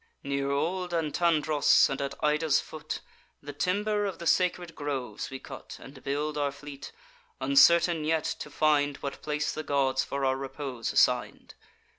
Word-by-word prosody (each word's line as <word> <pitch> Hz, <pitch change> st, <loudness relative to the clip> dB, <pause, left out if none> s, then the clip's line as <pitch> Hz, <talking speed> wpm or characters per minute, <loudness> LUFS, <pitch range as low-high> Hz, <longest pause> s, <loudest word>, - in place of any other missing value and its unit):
Near 140 Hz, -1 st, -1 dB
old 175 Hz, +5 st, -1 dB
Antandros, 155 Hz, -2 st, +3 dB
and 135 Hz, 0 st, -3 dB
at 140 Hz, 0 st, -3 dB
Ida's 150 Hz, 0 st, +3 dB
foot, 155 Hz, 0 st, -6 dB, 0.4 s
The 145 Hz, 0 st, -7 dB
timber 205 Hz, +6 st, 0 dB
of 190 Hz, -, -5 dB
the 170 Hz, -, -8 dB
sacred 175 Hz, -1 st, +1 dB
groves 135 Hz, -8 st, -4 dB
we 135 Hz, -, -6 dB
cut, 135 Hz, 0 st, -10 dB
And 135 Hz, -1 st, -13 dB
build 150 Hz, +2 st, -2 dB
our 145 Hz, -1 st, 0 dB
fleet; 140 Hz, 0 st, -10 dB, 0.5 s
uncertain 170 Hz, -, +5 dB
yet 160 Hz, 0 st, +1 dB, 0.2 s
to -, -, -6 dB
find 145 Hz, -2 st, +2 dB
What 140 Hz, -, -6 dB
place 150 Hz, 0 st, -1 dB
the 155 Hz, -, -4 dB
gods 135 Hz, -3 st, +1 dB
for 140 Hz, 0 st, -2 dB
our 130 Hz, 0 st, +1 dB
repose 135 Hz, -3 st, -4 dB
assign'd. -, -, +1 dB
150 Hz, 155 wpm, -28 LUFS, 140-165 Hz, 0.5 s, uncertain